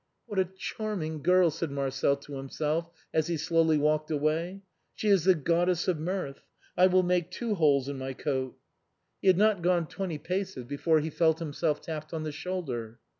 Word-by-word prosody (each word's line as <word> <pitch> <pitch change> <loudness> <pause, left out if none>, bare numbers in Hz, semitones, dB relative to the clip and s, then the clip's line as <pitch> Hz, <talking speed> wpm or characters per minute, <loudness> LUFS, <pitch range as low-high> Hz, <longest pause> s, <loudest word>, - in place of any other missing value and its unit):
" - - -50
What 205 -5 -2
a 190 - +4
charming 185 -4 -4
girl," 180 +1 +4
said 165 +1 -3
Marcel 140 0 0
to 140 +1 -12
himself, 150 +5 -2 0.2
as 160 0 +2
he 170 -1 -1
slowly 160 0 +3
walked 155 +1 +1
away; 160 +6 -1 0.2
" - - -48
she 215 - -1
is 195 -5 +4
the 190 -1 +6
Goddess 170 +3 +1
of 180 -4 +1
Mirth. 165 -4 -3 0.3
I 180 +1 +6
will 185 0 +4
make 175 -1 +1
two 235 -3 -2
holes 145 -7 +3
in 140 -1 -4
my 130 0 -4
coat." 130 -2 -2 0.6
He - - -2
had 185 -2 +6
not 210 -2 +3
gone 175 -1 +2
twenty 180 -1 -4
paces 180 -3 -3
before 150 +4 +1
he 160 +1 -3
felt 160 0 +3
himself 155 -1 -1
tapped 155 0 -6
on 160 - -3
the 155 - -3
shoulder. 140 -9 -4
160 Hz, 195 wpm, -29 LUFS, 150-180 Hz, 0.6 s, the